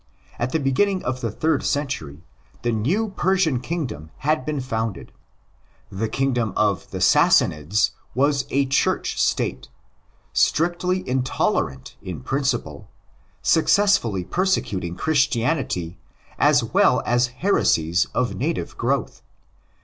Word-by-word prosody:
At 120 +2 -1
the - - +1
beginning 185 +8 +1
of 130 0 -2
the 115 - -1
third 160 +9 0
century 90 - -3 0.4
the 120 - +1
new 165 - 0
Persian 185 -9 +1
kingdom 125 - -4 0.2
had 155 -2 +1
been 150 -2 -1
founded. 115 -6 -4 0.8
The 110 +3 -2
kingdom 125 -6 0
of 105 -3 0
the - - -6
Sassanidse 80 +8 +3 0.2
was 140 +1 +1
a 140 +1 +2
Church 135 0 0
State, - - -1 0.6
strictly 175 +3 +1
intolerant 130 0 -1
in 90 +6 -7
principle, 125 - -2 0.5
successfully 160 - +3
persecuting 110 - -1
Chris 145 - +2
tianity 115 - -2 0.4
as - - +4
well - - +3
as 120 0 +2
heresies 120 - +1
of - - 0
native - - -3
growth. - - -1
130 Hz, 115 wpm, -22 LUFS, 105-155 Hz, 0.8 s, as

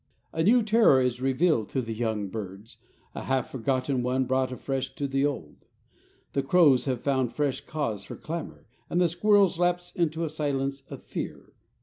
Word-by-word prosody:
A 160 - -1
new 230 +7 +5
terror 215 - +5
is 125 -1 0
revealed 135 - +2
to 135 - -1
the 115 -3 -3
young 110 -3 -2
birds, 100 +1 -8 0.4
a - - -6
half 135 -1 -1
forgotten 130 +1 -1
one 130 +1 0
brought 130 0 0
afresh 135 +1 -3
to 140 - -2
the 135 +1 +1
old. 120 - -6 0.8
The 140 - +1
crows 140 -3 +4
have 130 -4 -1
found 130 -4 0
fresh 145 -3 -1
cause 140 -10 -2
for - - -8
clamor, 165 +1 -6 0.2
and 175 - 0
the 180 - +4
squirrels 195 +1 +3
lapse 175 0 0
into 165 -1 0
a - - -3
silence 140 -3 -2
of - - -9
fear. - - -6
135 Hz, 180 wpm, -27 LUFS, 125-165 Hz, 0.8 s, new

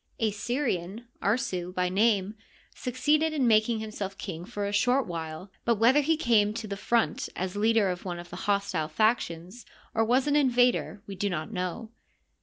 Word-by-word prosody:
A 220 -2 +1
Syrian, 220 -2 -2 0.2
Arsu 200 -6 -1
by 180 0 +1
name, 200 +1 +2 0.4
succeeded 300 +5 +1
in 275 -5 +1
mak 215 0 +4
ing 230 -2 0
himself 205 -3 -5
king 175 -3 -6
for 205 -1 -4
a 200 - -2
short 250 +5 +3
while, 165 +1 -6
but 235 - +2
whether 240 +7 +5
he 315 +2 +1
came 215 -7 +3
to 225 -1 -5
the 200 - -4
front 230 +3 0
as 185 +1 -3
leader 220 0 +3
of 180 -1 -3
one 175 -2 -4
of 175 0 -10
the - - -6
hostile 200 -6 0
factions 215 -1 -1 0.3
or 225 - +2
was 250 +4 +2
an 290 0 +1
invader 250 -6 +2
we 200 - -7
do 200 +2 -1
not 175 +4 -4
know. 185 +5 -4
215 Hz, 185 wpm, -28 LUFS, 185-240 Hz, 0.4 s, whether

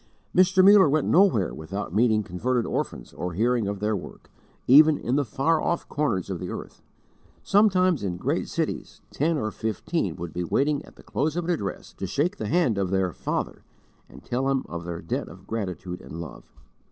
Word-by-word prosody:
Mr. 185 0 +5
Muller 200 -5 +8
went 150 +1 +2
nowhere 170 - +4
without 85 +3 -6
meeting 110 0 +3
converted 120 +7 -1
orphans - - -4
or 90 0 -4
hearing 115 +3 +1
of 100 0 -3
their 105 +1 0
work, 95 - -9 0.3
even 150 +3 +7
in 125 - -1
the 145 - +2
far 145 +7 +1
off 170 - -1
corners 120 - -1
of 95 -3 -4
the - - -5
earth. - - -8 0.6
Sometimes 185 -5 +3
in 90 -4 -3
great - - -1
cities - - -3
ten 160 +3 0
or 110 -6 -2
fifteen 110 - -2
would 85 -1 -7
be 90 - -2
waiting 140 - +1
at - - -17
the - - -16
close 150 +2 -1
of 175 - 0
an 175 - 0
address 100 - -4
to 95 - -5
shake 170 - 0
the - - -4
hand 155 - +2
of 95 -2 0
their 95 -2 0
"father," - - -3 0.5
and - - -14
tell 130 +3 -1
him 135 -1 0
of 85 -1 -6
their 85 -2 -5
debt 85 - -3
of 90 +3 -14
gratitude 95 -4 -4
and 80 - -9
love. 80 -4 -8
115 Hz, 195 wpm, -25 LUFS, 95-155 Hz, 0.6 s, Muller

